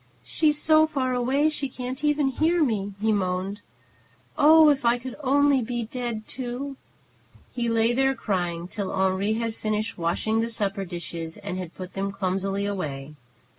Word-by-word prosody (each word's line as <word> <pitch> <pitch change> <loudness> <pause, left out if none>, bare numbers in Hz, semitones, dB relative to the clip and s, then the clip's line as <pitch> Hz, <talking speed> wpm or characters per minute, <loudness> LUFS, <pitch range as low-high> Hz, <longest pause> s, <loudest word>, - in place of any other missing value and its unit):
"She's 300 -2 +1
so 315 +1 +5
far 265 -4 -1
away 260 +4 +2
she 295 -3 -2
can't 255 +3 -6
even 295 -2 +2
hear 320 +5 +2
me!" 205 -6 -1
he 220 +1 +2
moaned. 195 0 -1 0.7
"Oh, 310 +1 +7
if 280 -3 +2
I 235 +1 +3
could 250 +1 -7
only 285 0 +3
be 240 0 -3
dead, 235 -1 -4
too!" 260 +2 -5 0.8
He 240 -1 -1
lay 230 +1 +2
there, 270 +1 +2
crying, 175 -6 -2
till 200 0 -4
Henri 190 +2 +1
had 230 0 -2
finished 215 -2 -2
washing 220 +7 0
the 230 - -1
supper 200 -3 -1
dishes 170 -2 -6
and 200 -3 -5
had 175 -2 -7
put 185 0 -8
them 195 0 -2
clumsily 195 +1 -1
away. 150 -8 -4
225 Hz, 165 wpm, -25 LUFS, 195-270 Hz, 0.8 s, Oh